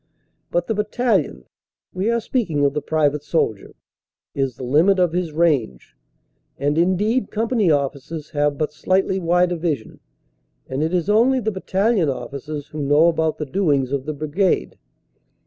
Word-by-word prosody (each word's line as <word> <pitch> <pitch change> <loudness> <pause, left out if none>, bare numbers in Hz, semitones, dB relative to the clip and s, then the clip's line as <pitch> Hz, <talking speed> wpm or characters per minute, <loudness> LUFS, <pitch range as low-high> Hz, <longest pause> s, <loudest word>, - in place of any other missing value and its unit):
But 175 0 0
the 225 - -1
battalion 210 - 0 0.5
we 190 +4 -1
are 235 0 +2
speaking 190 - 0
of 140 - +1
the 150 - -2
private 150 -1 +1
soldier 130 -10 -2 0.6
is 135 -2 -1
the - - -9
limit 160 +10 +3
of 180 -3 +2
his 175 -2 -1
range. 150 - 0 0.6
And, 145 +2 0
indeed, 190 +9 +1
company 225 -3 +1
officers 145 +1 -2
have 145 -1 0
but 150 0 -2
slightly 190 +3 0
wider 175 0 +2
vision, 155 -9 -3 0.7
and 130 +2 -3
it 160 +1 0
is 180 -1 0
only 235 +5 +4
the 220 -2 -1
battalion 190 -2 +1
officers 140 +2 -6
who 155 - -6
know 145 +4 +4
about 160 -1 0
the 150 - -3
doings 145 -6 0
of 140 -1 -2
the 155 - -2
brigade. 155 +6 -1
160 Hz, 155 wpm, -21 LUFS, 145-190 Hz, 0.7 s, only